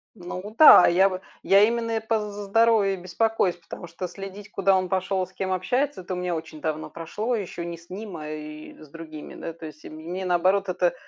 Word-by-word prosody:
Ну 185 +2 -8
да, 300 - +10
я 190 +3 +5
в 185 -1 -4 0.2
я 195 +1 +6
именно 230 0 0
по 220 0 0
з 210 -1 -5
за 205 0 -6
здоровье 220 -1 +3
и - - -11
беспокоюсь. 185 +1 0
Потому 170 0 -10
что 170 +2 -6
следить, 195 +2 -9
куда 195 -1 +3
он 185 -1 0
пошёл 190 0 0
и - - -5
с 185 - -23
кем 190 0 -3
общается, 250 +7 -1
это 185 +1 -6
у - - -3
меня 180 -1 -2
очень 160 -1 -8
давно 155 0 -3
прошло. 210 +10 -3
Ещё 185 -5 -5
не 170 0 -6
с 170 +1 -19
ним, 195 -1 -7
а 155 -1 -7
и 155 0 -8
с 155 - -14
другими, 155 -1 -10
да. 165 - -6
То 160 -1 -9
есть 155 0 -13
мне, 170 +5 -6
наоборот, 185 +3 +2
это 180 -1 +1
185 Hz, 225 wpm, -25 LUFS, 170-205 Hz, 0.2 s, да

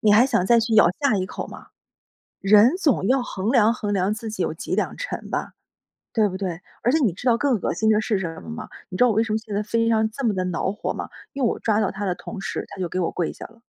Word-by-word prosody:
你 215 - +4
还 220 +4 +7
想 230 -9 +1
再 235 +3 +5
去 225 0 0
咬 215 -5 +7
下 280 -6 +3
一 185 - -1
口 - - -6
吗？ - - -12 0.7
人 210 - +6
总 285 - +1
要 260 +1 +3
衡 215 -1 -2
量 230 -4 +5
衡 210 -4 -3
量 190 +1 +1
自 220 +1 -5
己 200 -4 -3
有 - - -1
几 160 - -4
两 - - -1
沉 - - -5
吧， - - -3 0.6
对 215 -3 +3
不 185 - -5
对？ 180 -3 -4 0.2
而 245 - +2
且 - - +5
你 215 - +3
知 185 +9 -6
道 235 -1 +4
更 260 -4 +1
恶 - - -1
心 220 - +1
的 215 -1 +4
是 215 -1 0
什 165 -3 -5
么 80 - -10
吗？ 80 - -7 0.2
你 185 - -5
知 250 - +5
道 250 - +5
我 - - +2
为 220 - +4
什 220 -2 -3
么 - - +2
现 220 -2 -8
在 205 - 0
在 210 - -9
飞 230 - 0
机 230 - +2
上 220 -1 +2
这 275 +5 -6
么 220 - +2
地 185 -1 -1
恼 180 +1 -1
火 205 - -3
吗？ - - -6 0.2
因 275 - -2
为 235 - +4
我 - - -3
抓 220 -2 +1
到 200 - 0
他 200 +1 -4
的 180 -2 0
同 210 +3 -8
时， 195 - -3
他 - - -10
就 180 - 0
给 185 - -3
我 170 - 0
跪 175 - -2
下 - - -9
了。 230 0 -22
215 Hz, 325 characters per minute, -23 LUFS, 190-230 Hz, 0.7 s, 还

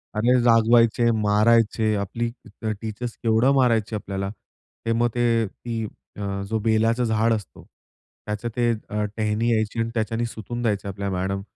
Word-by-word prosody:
अरे, 120 +4 +3
जागवायचे, 115 0 +4
मारायचे, 110 +1 +3
आपली 110 +4 -2 0.5
टीचर्स 115 +2 -5
केवढं 115 +4 +3
मारायचे 115 -5 +2
आपल्याला. 100 -1 -4 0.6
ते 115 - +1
मग 120 +1 +2
ते 115 -2 +2
ती 115 +3 -5 0.4
अ, 100 -1 -3
जो 110 - 0
बेलाचं 115 +2 +2
झाड 110 0 +2
असतो 105 -3 -6
त्याचं 105 +2 -9
ते 120 -1 +2 0.2
अ, 105 0 -1
टेहणी 110 +2 +1
यायची 110 0 0
आणि 115 - 0
त्याच्याने 115 +1 -1
सुतून 115 +1 -6
द्यायचे 105 -4 -1
आपल्या 100 +1 -3
मॅडम 95 +1 -2
110 Hz, 145 wpm, -24 LUFS, 105-115 Hz, 0.6 s, जागवायचे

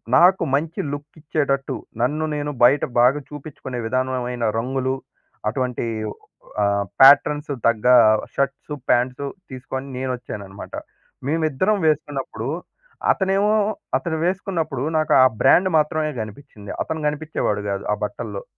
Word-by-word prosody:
నాకు 180 +7 +6
మంచి 155 +3 -2
లుక్ 145 +1 -6
ఇచ్చేటట్టు, 140 -3 -1 0.3
నన్ను 150 +6 +1
నేను 145 0 -2
బయట 130 +4 +5 0.2
బాగా 125 +4 +5
చూపించుకునే 135 -4 -7
విధానమైన 125 -1 -2 0.2
రంగులు, 130 +2 -1 0.5
అటువంటి 125 0 -2 0.8
ఆహ్, 100 0 +1 0.2
ప్యాట్రన్స్ 145 +2 +6 0.2
తగ్గ 115 0 +1 0.5
షర్ట్సు 140 +2 -2 0.2
ప్యాంట్సు 125 +3 +1 0.2
తీసుకొని 130 +1 -6
నేను 130 0 -2
వచ్చాననమాట. 100 -5 -9 0.5
మేమిద్దరం 160 +6 +1
వేసుకున్నప్పుడు, 140 -6 -2 0.6
అతనేమో 195 +2 +2 0.4
అతను 160 +4 -3
వేసుకున్నప్పుడు, 175 -7 -2
నాకు 155 0 +2
ఆ - - +7 0.2
బ్రాండ్ 185 +7 +5
మాత్రమే 155 0 +1
గనిపిచ్చింది, 105 -1 -9
అతను 160 -1 -4
గనిపిచ్చేవాడు 150 -9 -2
గాదు 100 0 -3
ఆ - - +1
బట్టల్లో. 105 -1 -5
140 Hz, 115 wpm, -22 LUFS, 125-155 Hz, 0.8 s, ఆ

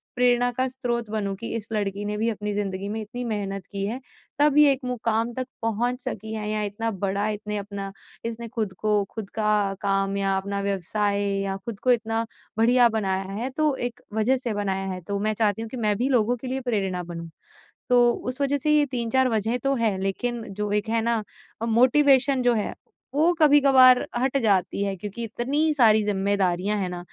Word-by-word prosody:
प्रेरणा 245 0 +3
का 260 0 +1
स्रोत 240 -3 -3
बनूँ 200 -3 -2
कि 230 +4 -6
इस 220 -2 -5
लड़की 205 -1 -2
ने 210 0 -2
भी 225 +2 +1
अपनी 210 -1 -3
ज़िंदगी 200 -1 -3
में 220 +2 -3
इतनी 220 +4 -6
मेहनत 195 -4 -3
की 195 -1 -2
है। 230 +5 -3 0.4
तब 295 0 +4
ये 300 -1 +7
एक 270 - 0
मुक़ाम 230 -1 -1
तक 255 +1 -4
पहुँच 235 +3 -1
सकी 220 +2 -5
है 215 -1 -4
या 215 0 -1
इतना 215 +3 -2
बड़ा 200 +1 -1
इसने 210 0 -4
अपना 200 -1 -5 0.3
इसने 230 0 -4
खुद 220 -4 -3
को 210 -1 +2
खुद 215 -3 -6
का 210 -2 +1
काम 195 -1 0
या 195 -1 +1
अपना 200 +1 -3
व्यवसाय 200 +1 -1 0.2
या 195 0 -2
खुद 230 -4 -6
को 255 - +2
इतना 225 -1 0 0.3
बढ़िया 240 +2 +5
बनाया 195 -4 -1
है। 225 +6 -3
तो 305 -3 +2
एक 245 0 -12
वजह 220 +5 +2
से 245 -3 -3
बनाया 195 -2 -2
है 185 - -7
तो 200 0 -2
मैं 215 +1 0
चाहती 215 -1 +1
हूँ 225 - -5
कि 255 - -7
मैं 210 -3 +1
भी 250 +5 0
लोगों 245 -1 +2
के 255 - -8
लिए 260 +1 -2
प्रेरणा 190 -5 -1
बनूँ। 170 -1 -7 0.6
तो 245 -1 +5
उस 255 +3 -5
वजह 280 +1 +1
से 300 +2 0
ये 295 - +4
3-4 250 +1 +1
वज़ह 225 +1 0
तो 275 0 +2
है, 225 -5 +1
लेकिन 235 +5 -2
जो 210 +1 -3
एक 210 +2 0
है 225 0 +1
ना, 230 -1 0 0.4
मोटिवेशन 260 +2 +4
जो 245 -1 +3
है 215 -3 -2 0.4
वो 320 +5 +3
कभी-कभार 275 -4 +7
हट 265 +2 +1
जाती 200 -1 +1
है। 200 -1 -2
क्योंकि 205 +5 -6
इतनी 275 +8 0
सारी 220 -6 +5
जिम्मेदारियाँ 200 -1 +1
हैं 185 -2 -2
ना, 180 0 -5
220 Hz, 200 wpm, -25 LUFS, 200-245 Hz, 0.6 s, ये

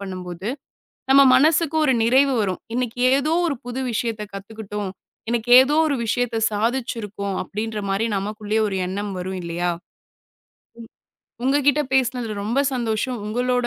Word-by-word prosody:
பண்ணும்போது 185 0 -6 0.6
நம்ம 275 +1 +7
மனசுக்கு 315 +3 +3
ஒரு 265 - +3
நிறைவு 265 +3 +4
வரும். 185 -3 -2
இன்னைக்கு 245 -1 -2 0.2
ஏதோ 300 +4 +1
ஒரு 280 - -1
புது 245 +1 -4
விஷயத்தக் 215 -2 -3
கத்துக்கிட்டோம். 205 0 -6 0.4
இன்னைக்கு 240 0 -1
ஏதோ 285 +3 +1
ஒரு 285 - 0
விஷயத்த 235 0 -1
சாதிச்சிருக்கோம். 210 -3 -2
அப்டின்ற 215 +3 -4
மாரி 210 +4 0
நமக்குள்ளே 210 +2 -3
ஒரு 195 - -3
எண்ணம் 200 +2 -4
வரும் 185 +1 -4
இல்லையா? 175 +1 -1 1.1
ம். 225 - -12 0.6
உங்ககிட்ட 285 +2 +3
பேசினதுல 245 -5 0
ரொம்ப 250 +6 +1
சந்தோஷம். 235 0 -2
உங்களோட 245 +2 0
225 Hz, 130 wpm, -22 LUFS, 205-255 Hz, 1.1 s, நம்ம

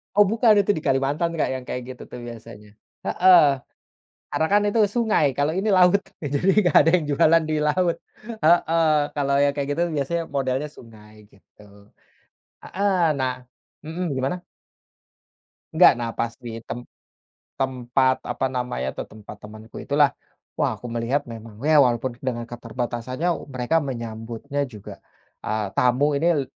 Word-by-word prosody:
Oh 205 - +7
bukan 225 -1 +4
itu 200 - +1
di - - -6
Kalimantan, 140 +5 +1
Kak, - - +1
yang 130 - -6
kayak 125 - -4
gitu 125 - -11
tuh 125 - -7
biasanya. 115 -2 -11 0.4
Heeh. 180 -1 +6 0.9
Karena 160 - +1
kan 205 +1 +3
itu 205 +2 +1
sungai 220 -8 +1
kalau 145 +2 +1
ini 195 +5 -1
laut. 185 +2 +5 0.2
Eee, 140 - -4
jadi 180 +7 +1 0.2
nggak 175 - +2
ada 165 - +3
yang 160 - -2
jualan 160 +3 +4
di - - +1
laut, 175 +2 +1 0.5
heeh, 165 -1 +4 0.3
kalau 140 -1 0
yang 140 0 +3
kayak 140 0 -3
gitu 170 - +1
biasanya 165 +5 -1
modelnya 135 +2 -1
sungai 110 -2 -15 0.2
gitu. 100 +1 -22 1.0
Heeh, 185 -5 +1
nah 130 -1 0 0.5
mhm, 165 +3 -4
gimana? 140 +8 -2 1.3
Nggak 180 - +8
nafas 115 0 -3
di 115 -1 -8
temp 120 0 -7 0.7
tempat 130 0 0
apa 135 - -2
namanya 125 - -3
tuh, - - -4
tempat 105 -1 -12
temanku 110 +1 -13
itulah, 145 -1 +2 0.4
wah - - +1
aku 120 - -7
melihat 120 +4 -2
memang 115 -1 -10
ya 155 +2 +3
walaupun 125 -2 +2
dengan 120 -2 -3
keterbatasannya 120 +5 -4 0.2
mereka 135 +5 0
menyambutnya 115 +3 -4
juga, 110 -7 -10 0.5
eee, 110 -2 -2
tamu 140 +4 +2
ini 160 +4 0
l - - -1
135 Hz, 150 wpm, -23 LUFS, 120-165 Hz, 1.3 s, Nggak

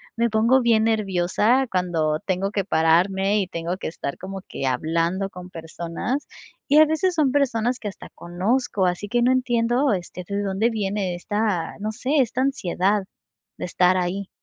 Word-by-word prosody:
me 235 0 +1
pongo 230 +4 +4
bien 225 -2 +3
nerviosa 215 +4 +2
cuando 165 -5 0
tengo 190 +1 0
que 200 -2 -1
pararme 190 +5 +2
y - - -1
tengo 170 +1 -4
que - - -5
estar 140 -3 -5
como 190 0 -7
que - - -5
hablando 165 +8 0
con 180 -1 -10
personas, 170 - -4 0.4
y 295 - +5
a 310 - +8
veces 315 +4 0
son 305 -5 +2
personas 250 -3 +1
que 210 - -4
hasta 200 - -11
conozco, 195 +4 -1
así 180 +3 -2
que 240 +3 +1
no 245 +2 +4
entiendo, 245 0 +2
este, 180 -1 -5
de 200 0 -2
dónde 200 +3 +1
viene 200 -3 -2
esta, 205 -2 -2
no 215 +1 -2
sé, 260 +7 -2
esta 255 0 +1
ansiedad 205 -6 0 0.5
de - - -6
estar 180 +1 +3
ahí. 185 +2 -2
200 Hz, 170 wpm, -23 LUFS, 180-235 Hz, 0.5 s, a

